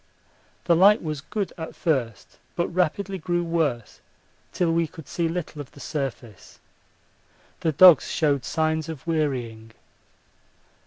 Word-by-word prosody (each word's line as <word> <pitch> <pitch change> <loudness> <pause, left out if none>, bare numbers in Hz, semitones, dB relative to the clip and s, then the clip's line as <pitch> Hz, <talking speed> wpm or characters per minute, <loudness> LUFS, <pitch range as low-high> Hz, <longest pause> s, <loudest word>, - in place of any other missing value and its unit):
The 170 - +3
light 200 +4 +5
was 155 -3 -4
good 200 +4 -4
at 160 - -7
first, 120 - -2 0.2
but 170 - -1
rapidly 185 +3 -1
grew 175 +1 -1
worse 155 -9 -2 0.5
till 175 -2 0
we 165 0 +1
could 160 -2 -13
see 170 -1 -1
little 165 -3 -5
of 140 - -12
the - - -14
surface. 130 - -6 1.0
The 160 - 0
dogs 170 0 +7
showed 145 -5 +1
signs 160 +2 -1
of 155 -5 -8
wearying. 125 -9 -2
160 Hz, 135 wpm, -24 LUFS, 140-170 Hz, 1.0 s, dogs